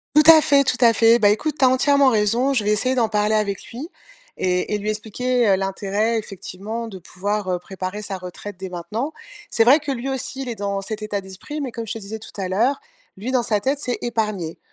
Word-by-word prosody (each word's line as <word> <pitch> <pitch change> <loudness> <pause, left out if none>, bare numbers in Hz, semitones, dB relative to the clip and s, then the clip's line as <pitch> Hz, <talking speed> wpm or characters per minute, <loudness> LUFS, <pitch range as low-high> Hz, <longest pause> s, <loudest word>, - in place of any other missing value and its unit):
Tout 305 - +7
à 320 -1 +7
fait, 280 -1 +4
tout 250 - 0
à 230 -1 +7
fait, 230 +1 +5
bah, 205 -2 +5
écoute, 280 +8 0
tu 265 - +5
as - - +6
entièrement 280 +1 +4
raison, 235 +4 +2
je 235 -6 +1
vais 210 - +1
essayer 255 +5 +1
d'en 235 -3 +2
parler 210 0 +1
avec 200 -3 -1
lui 265 +8 -7 0.5
et 180 +2 0
et - - +2
lui 210 +1 -3
expliquer, 235 +3 0
heu, 195 - +5
l'intérêt, 195 +4 -1
effectivement, 215 +2 -6
de 195 -4 -9
pouvoir, 200 +3 -3
heu, 180 - -1
préparer 190 +2 -6
sa 200 -2 -5
retraite 185 +2 -8
dès 190 0 -6
maintenant. 215 - -4 0.4
C'est 225 - +3
vrai 265 +7 +6
que 295 -2 -4
lui 260 0 -3
aussi, 265 0 -4
il 255 - -6
est 235 - -4
dans 200 -1 -2
cet 215 +2 -6
état 210 -1 -3
d'esprit, 190 +11 -7
mais 265 -3 -4
comme 230 0 -5
je - - -2
te - - -6
disais 215 +2 -7
tout 220 - -12
à 185 - -2
l'heure, 235 +9 +1 0.4
lui, 220 +7 -5
dans 255 -2 +2
sa 215 -3 +1
tête, 270 +7 -1
c'est 250 -4 -2
épargner. 210 -8 -2
215 Hz, 240 wpm, -22 LUFS, 200-250 Hz, 0.5 s, Tout